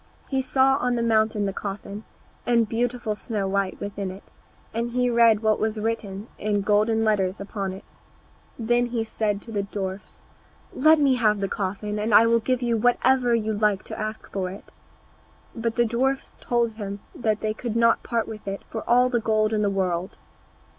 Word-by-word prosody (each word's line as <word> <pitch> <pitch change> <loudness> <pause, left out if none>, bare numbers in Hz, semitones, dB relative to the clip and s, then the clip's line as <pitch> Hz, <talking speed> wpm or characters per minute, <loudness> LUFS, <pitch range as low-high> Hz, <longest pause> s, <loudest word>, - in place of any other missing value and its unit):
He 265 -1 +1
saw 265 +1 +3
on 250 -2 0
the 235 - 0
mountain 220 -2 +2
the 195 - -2
coffin, 200 +1 -6 0.4
and 235 -2 +2
beautiful 235 0 -1
Snow 210 -2 -3
white 195 -1 -1
within 200 -1 -4
it, 190 +2 -9 0.5
and 230 +1 -1
he 250 0 +1
read 230 -2 +5
what 215 -1 +2
was 220 0 -1
written 210 -2 -3
in 205 -1 0
golden 215 +2 +2
letters 195 -3 +1
upon 200 -1 -4
it. 190 +2 -9 0.7
Then 240 +1 +1
he 235 -2 -1
said 210 -2 -2
to 230 - -10
the 205 -2 0
dwarfs, 195 -1 -6 0.5
"Let 310 +3 +5
me 275 -3 +3
have 215 -3 +2
the 195 - -1
coffin, 205 +2 -3
and 210 0 +2
I 225 - +8
will 230 0 +4
give 250 +2 -1
you 235 -1 +1
whatever 245 +1 +3
you 220 -1 -1
like 210 -2 +1
to - - -7
ask 215 0 -5
for 190 -2 -2
it." 195 +3 -11 0.8
But 230 -1 -2
the 240 - +3
dwarfs 265 +4 -1
told 235 -1 0
him 200 -2 -5
that 220 -3 -1
they 215 0 -1
could 230 0 -5
not 230 0 +4
part 230 -2 -1
with 215 -2 -9
it 195 0 -4
for 220 - -3
all 250 +1 +5
the 245 -1 +1
gold 215 -1 +1
in 215 - +1
the 205 - +2
world. 185 0 -2
220 Hz, 190 wpm, -24 LUFS, 205-235 Hz, 0.8 s, I